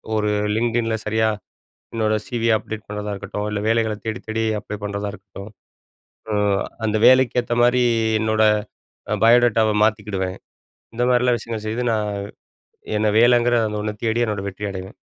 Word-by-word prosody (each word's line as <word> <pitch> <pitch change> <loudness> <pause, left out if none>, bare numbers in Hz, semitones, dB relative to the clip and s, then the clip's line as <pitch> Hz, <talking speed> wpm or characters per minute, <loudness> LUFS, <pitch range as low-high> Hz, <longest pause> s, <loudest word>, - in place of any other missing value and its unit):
ஒரு 105 -1 +1 0.3
லிங்கிடின்ல 115 0 0
சரியா, 110 +1 +1 0.7
என்னோட 110 -1 +1
சி.வி. 115 -2 -1
அப்டேட் 110 0 -7
பண்றதா 105 0 -4
இருக்கட்டும், 105 +1 -5
இல்ல 105 -1 -2
வேலைகளத் 110 -2 0
தேடித்தேடி 110 0 -3 0.2
அப்ளை 105 - -7
பண்றதா 100 0 -3
இருக்கட்டும். 100 0 -11 0.8
அ - - -1 0.5
அந்த 110 0 0
வேலைக்கு 130 -1 +5
ஏத்த 120 - -2
மாரி, 125 +1 +4 0.4
என்னோட 110 0 +1 0.8
பயோடேட்டாவ 115 -2 +4
மாத்திக்குடுவேன். 100 -4 -2 0.6
இந்த 120 - 0
மாரிலாம் 125 -1 +3
விஷயங்கள 115 -2 -5
செய்து 115 +3 -2
நான் 105 -1 -1 0.9
என்ன 110 +1 +1
வேலங்கிற 120 0 +4
அந்த 105 0 -4
ஒண்ணத் 105 -1 -5
தேடி 115 0 0
என்னோட 105 -3 -3
வெற்றி 100 +2 -11
அடைவேன். 95 0 -8
110 Hz, 140 wpm, -21 LUFS, 105-115 Hz, 0.9 s, வேலைக்கு